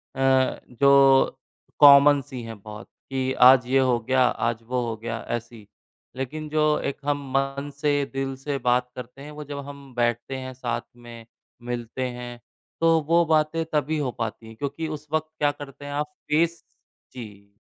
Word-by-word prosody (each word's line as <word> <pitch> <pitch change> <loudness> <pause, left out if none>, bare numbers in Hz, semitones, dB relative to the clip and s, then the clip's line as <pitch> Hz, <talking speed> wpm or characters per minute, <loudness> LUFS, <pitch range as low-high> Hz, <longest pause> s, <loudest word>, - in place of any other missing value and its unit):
अ, 130 0 +2
जो 135 +1 +5 0.4
कॉमन 145 0 +8
सी 130 -1 -8
हैं 115 -2 -8
बहुत, 105 +2 -10 0.2
कि 130 -1 -1
आज 125 0 +6
ये 135 +1 +3
हो 130 -2 +2
गया, 130 +3 +2
आज 115 -1 -1
वो 125 +2 -2
हो 115 - -3
गया 115 +1 -5 0.2
ऐसी। 115 -2 -13 0.5
लेकिन 150 +4 -5
जो 155 0 +2
एक 140 - -3
हम 145 0 0 0.2
मन 135 +1 -2
से, 145 -1 +2
दिल 135 0 -3
से 140 +1 -3
बात 125 -1 +1
करते 125 +2 -9
हैं, 150 +2 -9
वो 150 0 -8
जब 145 0 -7
हम 140 -2 -11
बैठते 120 +2 -1
हैं 130 0 -7
साथ 120 -2 -3
में, 120 -1 -12 0.4
मिलते 120 +1 -4
हैं 120 -1 -8 0.4
तो 165 -1 +4
वो 170 +1 +4
बातें 160 +1 +1
तभी 150 +1 0
हो 140 -4 -1
पाती 115 -1 -5
हैं, 110 - -12
क्योंकि 145 +6 -4
उस 155 -1 -7
वक़्त 155 0 0
क्या 145 -1 +3
करते 145 -1 -11
हैं 145 - -6
आप 150 +1 -3 0.2
फेस 165 +2 +1 0.5
जी, 100 -4 -11
135 Hz, 175 wpm, -24 LUFS, 120-145 Hz, 0.5 s, कॉमन